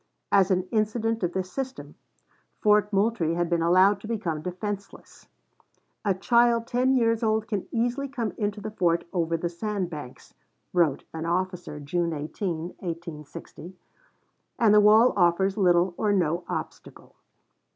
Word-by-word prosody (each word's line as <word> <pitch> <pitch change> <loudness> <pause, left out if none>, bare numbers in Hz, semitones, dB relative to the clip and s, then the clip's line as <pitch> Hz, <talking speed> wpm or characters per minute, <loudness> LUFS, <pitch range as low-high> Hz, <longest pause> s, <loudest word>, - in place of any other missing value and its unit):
As 195 -1 +4
an 185 -1 +2
incident 225 +1 0
of 175 -2 -1
this 185 -1 -3
system, 265 +2 -6 0.7
Fort 210 0 +3
Moultrie 195 -5 +1
had 175 0 -1
been 170 -1 +2
allowed 185 +4 +4
to 215 - -8
become 180 -9 -3
defenseless. 195 +4 -7 0.8
"A 200 -3 +1
child 235 +3 +3
ten 255 +3 +1
years 230 -2 +2
old 220 -1 0
can 205 -4 -3
easily 245 +4 -1
come 245 -5 -3
into 210 -1 -2
the 215 +1 -6
fort 170 -5 +1
over 165 -2 0
the 175 - -2
sand 185 +1 -3
banks," 145 -6 -9 0.4
wrote 170 -6 +2
an 160 0 -4
officer 180 -3 -2
June 170 +3 -1
18, 160 +3 -4
1860, 170 0 -8 0.8
"and 220 -3 +4
the 210 - +7
wall 215 +4 +6
offers 190 +1 +2
little 180 -3 +3
or 210 - +1
no 175 -3 0
obstacle." - - -7
190 Hz, 145 wpm, -26 LUFS, 170-215 Hz, 0.8 s, the